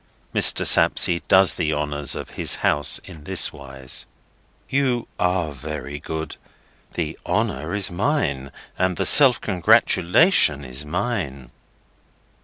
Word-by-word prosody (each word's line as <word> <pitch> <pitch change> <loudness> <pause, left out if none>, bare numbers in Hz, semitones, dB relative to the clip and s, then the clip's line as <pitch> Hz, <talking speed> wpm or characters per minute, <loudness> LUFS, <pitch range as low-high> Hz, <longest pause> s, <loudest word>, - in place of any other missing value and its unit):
Mr. - - +3
Sapsea 85 -1 +4
does 95 0 +5
the 80 - -2
honours 75 -1 -2
of - - -8
his - - 0
house 75 0 +2
in 75 -2 -13
this - - +1
wise. 65 -2 -7 0.6
"You 130 -3 -1
are 90 -3 0
very 75 +1 -7
good. 80 +1 -6 0.6
The - - -4
honour 75 +8 -2
is 100 -2 +1
mine 85 - -2 0.3
and 95 -1 0
the - - -1
self 135 -4 +5
congratulation 90 - +2
is 65 +3 -6
mine." 75 - -4
80 Hz, 120 wpm, -21 LUFS, 70-95 Hz, 0.6 s, does